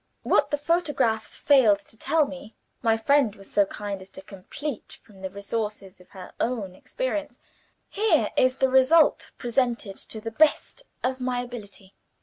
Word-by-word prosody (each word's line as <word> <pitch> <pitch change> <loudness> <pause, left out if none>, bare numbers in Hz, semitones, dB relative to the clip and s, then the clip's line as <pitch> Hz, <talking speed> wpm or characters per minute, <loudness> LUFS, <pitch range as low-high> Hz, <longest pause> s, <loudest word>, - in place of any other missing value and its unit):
What - - +3
the 290 - 0
photographs 290 -8 0
failed 255 -8 +5
to 200 - -16
tell 310 +7 +2
me, 270 -5 -10 0.3
my 225 -2 +2
friend 245 -2 +2
was 195 -2 -13
so 205 - +4
kind 200 -1 -6
as 190 - -12
to 190 - -10
complete 220 +8 -7
from 205 -4 -18
the 190 - -4
resources 200 -2 -5
of 180 - -20
her 185 -2 -11
own 225 -6 -2
experience. 310 - -4 0.5
Here 430 +2 +1
is 255 0 +3
the 265 - +2
result 265 +5 +4
presented 240 -5 -1
to 220 - -8
the 225 +1 -6
best 315 - +1 0.2
of 260 0 -1
my 250 -1 -1
ability. 205 -5 -10
230 Hz, 160 wpm, -25 LUFS, 200-280 Hz, 0.5 s, failed